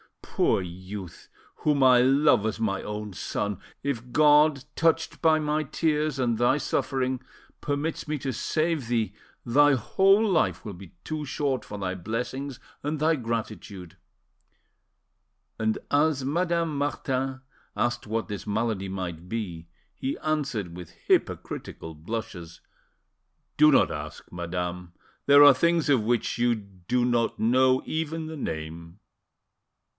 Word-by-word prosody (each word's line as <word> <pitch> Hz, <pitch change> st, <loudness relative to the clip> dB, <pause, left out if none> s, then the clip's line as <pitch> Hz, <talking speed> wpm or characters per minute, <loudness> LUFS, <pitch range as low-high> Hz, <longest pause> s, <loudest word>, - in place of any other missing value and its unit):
Poor 95 Hz, -, +1 dB
youth! 95 Hz, +1 st, -9 dB, 0.3 s
whom 145 Hz, -3 st, +2 dB
I 125 Hz, -1 st, +7 dB
love 135 Hz, -3 st, +4 dB
as 110 Hz, -, -3 dB
my 100 Hz, -4 st, -1 dB
own 105 Hz, -1 st, -5 dB
son, 100 Hz, +2 st, -3 dB, 0.2 s
if 125 Hz, -3 st, -3 dB
God, 150 Hz, -1 st, +5 dB
touched 165 Hz, 0 st, +1 dB
by 160 Hz, -1 st, +5 dB
my 155 Hz, 0 st, 0 dB
tears 155 Hz, -1 st, 0 dB
and 120 Hz, -4 st, 0 dB
thy 120 Hz, +3 st, +3 dB
suffering, 130 Hz, -3 st, -1 dB, 0.4 s
permits 145 Hz, +3 st, -3 dB
me 150 Hz, 0 st, -1 dB
to 135 Hz, -1 st, -3 dB
save 155 Hz, +2 st, -1 dB
thee, 115 Hz, -2 st, 0 dB, 0.3 s
thy 145 Hz, +4 st, +5 dB
whole 195 Hz, -, +3 dB
life 100 Hz, -, +1 dB
will 105 Hz, -, -5 dB
be 90 Hz, -1 st, -12 dB
too 155 Hz, -1 st, -4 dB
short 135 Hz, -3 st, -1 dB
for 105 Hz, 0 st, -8 dB
thy 95 Hz, -2 st, -2 dB
blessings 125 Hz, +7 st, -4 dB, 0.2 s
and 150 Hz, +1 st, -2 dB
thy 160 Hz, +2 st, +3 dB
gratitude!" 110 Hz, -, -5 dB, 1.6 s
And 110 Hz, -1 st, +1 dB
as 145 Hz, -2 st, +2 dB
Madame 170 Hz, +1 st, 0 dB
Martin 135 Hz, -2 st, -2 dB, 0.4 s
asked 120 Hz, -2 st, -1 dB
what 115 Hz, +1 st, -2 dB
this 105 Hz, 0 st, -6 dB
malady 105 Hz, -2 st, -1 dB
might 90 Hz, -2 st, -5 dB
be, 90 Hz, -7 st, -4 dB, 0.3 s
he 135 Hz, -, -3 dB
answered 135 Hz, -, -2 dB
with 90 Hz, -2 st, -9 dB, 0.2 s
hypocritical 80 Hz, -, -1 dB
blushes— 85 Hz, 0 st, -6 dB, 1.0 s
"Do 150 Hz, +1 st, +7 dB
not 135 Hz, -, +4 dB
ask, 75 Hz, 0 st, -7 dB
madame; 90 Hz, 0 st, -4 dB, 0.3 s
there 145 Hz, +1 st, +8 dB
are 145 Hz, -1 st, +10 dB
things 170 Hz, +4 st, +2 dB
of 135 Hz, -5 st, +4 dB
which 120 Hz, +1 st, 0 dB
you 120 Hz, 0 st, +3 dB
do 100 Hz, +3 st, -2 dB
not 120 Hz, -2 st, +1 dB
know 130 Hz, +3 st, +3 dB
even 160 Hz, 0 st, -3 dB
the 160 Hz, 0 st, -7 dB
name." 85 Hz, -, -6 dB
125 Hz, 135 wpm, -26 LUFS, 100-145 Hz, 1.6 s, are